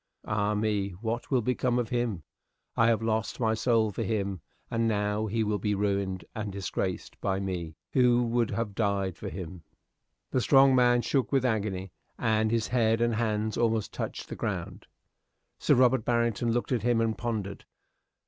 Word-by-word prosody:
Ah, 105 Hz, 0 st, 0 dB
me! 105 Hz, -2 st, 0 dB
what 115 Hz, +1 st, -3 dB
will 130 Hz, -4 st, +2 dB
become 125 Hz, 0 st, +1 dB
of 120 Hz, -2 st, -1 dB
him? 120 Hz, -9 st, -1 dB, 0.5 s
I 115 Hz, -, +4 dB
have 115 Hz, -1 st, +2 dB
lost 110 Hz, -1 st, -1 dB
my 110 Hz, -2 st, +2 dB
soul 110 Hz, -1 st, +2 dB
for -, -, -4 dB
him, 100 Hz, -4 st, -2 dB, 0.3 s
and 115 Hz, -1 st, +1 dB
now 105 Hz, 0 st, 0 dB
he 110 Hz, +2 st, 0 dB
will 105 Hz, -1 st, -1 dB
be 105 Hz, +2 st, 0 dB
ruined 100 Hz, -3 st, -1 dB
and 105 Hz, -2 st, -4 dB
disgraced 95 Hz, -1 st, -4 dB
by 95 Hz, -1 st, 0 dB
me, 90 Hz, -5 st, -4 dB, 0.2 s
who 125 Hz, -2 st, +4 dB
would 120 Hz, -1 st, +1 dB
have 115 Hz, -3 st, -2 dB
died 100 Hz, -3 st, 0 dB
for -, -, -6 dB
him." 90 Hz, -2 st, -7 dB, 0.7 s
The 130 Hz, -, +1 dB
strong 135 Hz, +1 st, +6 dB
man 120 Hz, -1 st, +4 dB
shook 135 Hz, -3 st, 0 dB
with 135 Hz, -2 st, +2 dB
agony, 100 Hz, -5 st, -1 dB, 0.3 s
and 110 Hz, -1 st, +1 dB
his 115 Hz, -1 st, 0 dB
head 115 Hz, -2 st, +2 dB
and 120 Hz, 0 st, +2 dB
hands 110 Hz, -1 st, -1 dB
almost 115 Hz, -2 st, +1 dB
touched -, -, -5 dB
the -, -, -6 dB
ground. -, -, -4 dB, 0.7 s
Sir -, -, +4 dB
Robert 125 Hz, -1 st, +4 dB
Barrington 115 Hz, 0 st, +1 dB
looked 120 Hz, +3 st, -1 dB
at 125 Hz, -4 st, +1 dB
him 120 Hz, +1 st, +2 dB
and 115 Hz, -1 st, +1 dB
pondered. 110 Hz, -4 st, -4 dB
110 Hz, 175 wpm, -28 LUFS, 100-120 Hz, 0.7 s, strong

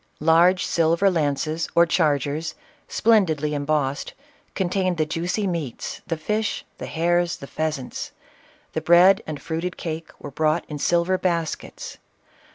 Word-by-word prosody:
Large 170 Hz, +4 st, +4 dB
silver 170 Hz, +4 st, +2 dB
lances, 155 Hz, 0 st, -1 dB
or 170 Hz, -, +6 dB
chargers, 155 Hz, -2 st, 0 dB, 0.3 s
splendidly 165 Hz, -10 st, +2 dB
embossed, 145 Hz, -1 st, -1 dB, 0.4 s
contained 185 Hz, -1 st, 0 dB
the 155 Hz, -, +2 dB
juicy 175 Hz, +6 st, -2 dB
meats, 165 Hz, -9 st, -4 dB
the 165 Hz, -, -2 dB
fish, 210 Hz, +7 st, -2 dB
the -, -, -5 dB
hares, 175 Hz, +1 st, +1 dB
and 140 Hz, -, -9 dB
pheasants. 155 Hz, -5 st, -4 dB, 0.6 s
The -, -, -1 dB
bread 180 Hz, +3 st, +6 dB
and 155 Hz, -2 st, -5 dB
fruited 170 Hz, +2 st, -4 dB
cake 160 Hz, -1 st, -5 dB
were 145 Hz, -, -8 dB
brought 155 Hz, +3 st, +1 dB
in 150 Hz, -1 st, -6 dB
silver 175 Hz, +4 st, +2 dB
baskets. 170 Hz, -3 st, -3 dB
165 Hz, 130 wpm, -23 LUFS, 155-180 Hz, 0.6 s, or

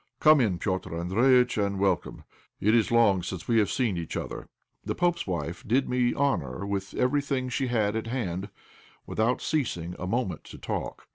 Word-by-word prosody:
Come 155 Hz, -2 st, +6 dB
in, 100 Hz, -7 st, +1 dB
Petr' 95 Hz, 0 st, -2 dB
Andréjïtch, 115 Hz, +6 st, +3 dB
and 100 Hz, 0 st, -1 dB
welcome. 95 Hz, -2 st, 0 dB, 0.4 s
It 105 Hz, +2 st, +3 dB
is 115 Hz, -1 st, +3 dB
long 110 Hz, -6 st, +4 dB
since 90 Hz, 0 st, -6 dB
we 115 Hz, -1 st, +4 dB
have 105 Hz, -, +2 dB
seen 115 Hz, -9 st, 0 dB
each 85 Hz, -2 st, -4 dB
other." -, -, -5 dB, 0.4 s
The -, -, -3 dB
pope's 175 Hz, -5 st, 0 dB
wife 85 Hz, -1 st, -3 dB
did 130 Hz, +5 st, +2 dB
me 125 Hz, -1 st, +1 dB
honour 100 Hz, -, -1 dB
with 100 Hz, -1 st, -3 dB
everything 135 Hz, -1 st, 0 dB
she 125 Hz, +2 st, -1 dB
had 110 Hz, -4 st, +1 dB
at 110 Hz, 0 st, -3 dB
hand, 100 Hz, -6 st, -3 dB, 0.6 s
without 115 Hz, +3 st, 0 dB
ceasing 90 Hz, -, -1 dB
a 90 Hz, -, -4 dB
moment 115 Hz, -2 st, -2 dB
to -, -, -11 dB
talk. -, -, -5 dB
110 Hz, 180 wpm, -27 LUFS, 95-125 Hz, 0.6 s, Come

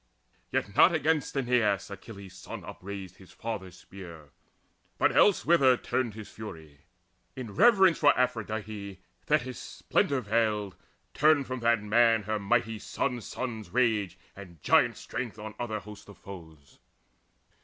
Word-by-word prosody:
Yet -, -, -2 dB
not -, -, +6 dB
against 150 Hz, -2 st, 0 dB
Aeneas 120 Hz, -7 st, +1 dB
Achilles' 100 Hz, -2 st, -10 dB
son -, -, -9 dB
upraised 95 Hz, -1 st, -8 dB
his 95 Hz, -, -16 dB
father's 100 Hz, -5 st, -6 dB
spear, 85 Hz, -6 st, -12 dB, 0.7 s
But -, -, +3 dB
elsewhither 165 Hz, -10 st, +5 dB
turned 120 Hz, -4 st, -2 dB
his 110 Hz, -2 st, -8 dB
fury: 80 Hz, -9 st, -10 dB, 0.6 s
in 120 Hz, -5 st, -7 dB
reverence 190 Hz, -4 st, +5 dB
For 145 Hz, -1 st, +6 dB
Aphrodite, 110 Hz, -5 st, -3 dB, 0.3 s
Thetis 130 Hz, -5 st, 0 dB
splendour 140 Hz, -2 st, -1 dB
veiled 105 Hz, -2 st, 0 dB, 0.4 s
Turned 150 Hz, -2 st, +4 dB
from 130 Hz, 0 st, -4 dB
that 115 Hz, -2 st, +2 dB
man 115 Hz, +1 st, +3 dB
her 110 Hz, +1 st, -2 dB
mighty 110 Hz, +1 st, 0 dB
son's 125 Hz, 0 st, -3 dB
son's 115 Hz, -5 st, -5 dB
rage 110 Hz, -7 st, +1 dB, 0.2 s
And 90 Hz, -5 st, -12 dB
giant -, -, +4 dB
strength 105 Hz, -, -5 dB
on 110 Hz, 0 st, -7 dB
other 110 Hz, -3 st, -3 dB
hosts 105 Hz, 0 st, -12 dB
of 100 Hz, -, -13 dB
foes. 80 Hz, -7 st, -13 dB
110 Hz, 135 wpm, -28 LUFS, 100-125 Hz, 0.7 s, not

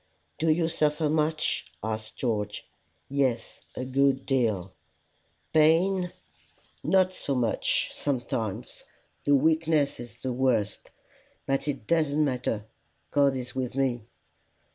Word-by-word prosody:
"Do 160 Hz, -, +2 dB
you 160 Hz, +1 st, +3 dB
suffer 150 Hz, -1 st, +1 dB
much?" 155 Hz, 0 st, 0 dB
asked 110 Hz, 0 st, -4 dB
George. 105 Hz, -4 st, -2 dB, 0.4 s
"Yes 130 Hz, -3 st, -1 dB, 0.2 s
a 130 Hz, -, -3 dB
good 135 Hz, 0 st, +2 dB
deal." 110 Hz, -9 st, 0 dB, 0.8 s
"Pain?" 175 Hz, +4 st, +4 dB, 0.7 s
"Not 185 Hz, +4 st, +3 dB
so 140 Hz, -6 st, -2 dB
much; 120 Hz, -3 st, 0 dB
sometimes. 120 Hz, -5 st, -3 dB, 0.4 s
The 145 Hz, -, +5 dB
weakness 155 Hz, -1 st, +2 dB
is 120 Hz, -2 st, -9 dB
the 130 Hz, -1 st, -1 dB
worst. 120 Hz, -5 st, 0 dB, 0.6 s
But 135 Hz, +2 st, 0 dB
it 145 Hz, -2 st, -3 dB
doesn't 155 Hz, -2 st, +2 dB
matter: 125 Hz, -5 st, -1 dB, 0.5 s
God 140 Hz, -2 st, +4 dB
is 125 Hz, -1 st, -5 dB
with 130 Hz, -1 st, -3 dB
me." 125 Hz, -5 st, 0 dB
135 Hz, 115 wpm, -27 LUFS, 120-155 Hz, 0.8 s, The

